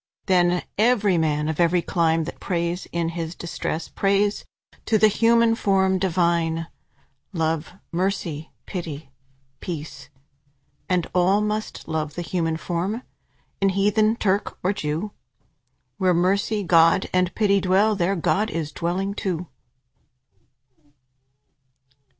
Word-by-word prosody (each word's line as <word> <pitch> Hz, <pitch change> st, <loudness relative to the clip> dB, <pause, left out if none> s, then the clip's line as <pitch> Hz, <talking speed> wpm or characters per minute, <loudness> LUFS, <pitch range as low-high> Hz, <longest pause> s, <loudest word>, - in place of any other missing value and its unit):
Then 180 Hz, -2 st, +3 dB, 0.2 s
every 210 Hz, -6 st, +3 dB
man, 150 Hz, -1 st, 0 dB
of 160 Hz, 0 st, -3 dB
every 175 Hz, 0 st, +3 dB
clime, 165 Hz, -2 st, +1 dB
That 170 Hz, -, -7 dB
prays 170 Hz, 0 st, -2 dB
in 170 Hz, -1 st, -1 dB
his 165 Hz, 0 st, -5 dB
distress, 170 Hz, -1 st, -4 dB
Prays 200 Hz, +1 st, +1 dB, 0.4 s
to 220 Hz, -, +4 dB
the 215 Hz, -, +6 dB
human 230 Hz, +2 st, +4 dB
form 190 Hz, -3 st, +2 dB
divine: 170 Hz, -3 st, +1 dB, 0.7 s
Love, 160 Hz, -1 st, -1 dB, 0.2 s
Mercy, 170 Hz, -4 st, -2 dB
Pity, 155 Hz, -7 st, -6 dB, 0.5 s
Peace. 150 Hz, -5 st, -7 dB, 0.8 s
And 180 Hz, -2 st, +1 dB
all 185 Hz, +3 st, +3 dB
must 210 Hz, +1 st, -3 dB
love 155 Hz, -1 st, -3 dB
the 175 Hz, -, -3 dB
human 165 Hz, -2 st, -1 dB
form, 185 Hz, +8 st, -3 dB, 0.6 s
In 195 Hz, -, +4 dB
heathen, 210 Hz, +3 st, +2 dB
Turk, 200 Hz, -3 st, -1 dB
or 185 Hz, +3 st, +2 dB
Jew. 160 Hz, +4 st, -3 dB, 0.9 s
Where 185 Hz, -2 st, +3 dB
Mercy, 200 Hz, +4 st, +1 dB
Love, 165 Hz, +2 st, +5 dB
and 180 Hz, -1 st, +1 dB
Pity 200 Hz, -2 st, +3 dB
dwell, 195 Hz, +4 st, +3 dB
There 195 Hz, +1 st, +1 dB
God 205 Hz, +5 st, +1 dB
is 160 Hz, -5 st, -3 dB
dwelling 185 Hz, +5 st, -2 dB
too. 180 Hz, -4 st, -3 dB
180 Hz, 120 wpm, -23 LUFS, 165-200 Hz, 0.9 s, the